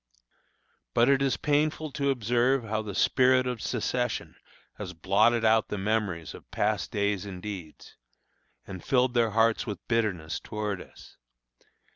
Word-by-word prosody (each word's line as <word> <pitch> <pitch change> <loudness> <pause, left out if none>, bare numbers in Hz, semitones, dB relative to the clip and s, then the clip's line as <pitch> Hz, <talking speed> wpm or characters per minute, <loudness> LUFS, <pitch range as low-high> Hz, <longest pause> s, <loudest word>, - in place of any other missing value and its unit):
But 120 +2 +5
it 140 -1 +4
is 135 -1 +1
painful 150 +1 0
to 140 0 -1
observe 125 +1 +1
how 110 0 -2
the 105 -3 -6
spirit 130 +3 +4
of 125 -3 -3
secession 125 0 -2 0.4
has 95 -3 -6
blotted 105 +7 +3
out 110 0 +4
the 105 - -4
memories 95 -6 -1
of - - -13
past 105 -1 -1
days 100 -2 -1
and 95 -2 -7
deeds, 90 -5 -9 0.7
and 95 -3 -8
filled 125 -1 +2
their 120 -2 +3
hearts 115 +2 +2
with 105 - -6
bitterness 95 -9 -1
toward 105 -3 -4
us. - - -15
110 Hz, 145 wpm, -28 LUFS, 100-125 Hz, 0.7 s, But